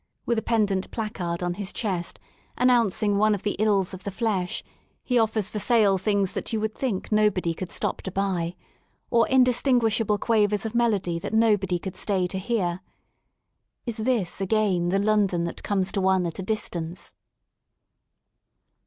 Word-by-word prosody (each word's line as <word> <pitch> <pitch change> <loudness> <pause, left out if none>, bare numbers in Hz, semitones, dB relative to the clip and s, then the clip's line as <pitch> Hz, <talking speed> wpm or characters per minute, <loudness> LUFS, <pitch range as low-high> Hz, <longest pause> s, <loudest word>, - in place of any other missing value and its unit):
With 235 -2 +1
a - - -6
pendent 205 -5 0
placard 180 -6 -3
on 175 0 -1
his 195 +1 -4
chest, 185 -6 -3 0.4
announcing 225 -5 +3
one 215 0 +4
of 200 - -8
the 205 - -1
ills 200 -3 +2
of 185 0 -8
the - - -3
flesh, 195 -3 -2 0.4
he 250 -2 +2
offers 220 -3 +1
for 210 - -4
sale 205 -4 +3
things 200 -1 +1
that - - -4
you 220 - 0
would 220 0 -2
think 225 -8 -3
nobody 210 -5 +2
could 185 +2 -6
stop - - -1
to 190 - -6
buy, 180 -3 -1 0.6
or 235 -1 +4
indistinguishable 240 -4 +3
quavers 210 -1 +1
of 220 - -3
melody 205 -8 +1
that 210 - -4
nobody 205 -5 +3
could 185 +1 -7
stay 190 -3 0
to 190 +1 -4
bean 190 -5 -1 1.1
Is 235 -2 -3
this 220 -6 -1
again 190 -3 +1
the 195 - +2
London 200 -4 +2
that 170 - -5
comes 195 -2 0
to 195 - -1
one 190 -1 +2
at 170 +1 -5
a - - -1
distance? 180 -4 -4
205 Hz, 165 wpm, -25 LUFS, 185-220 Hz, 1.1 s, one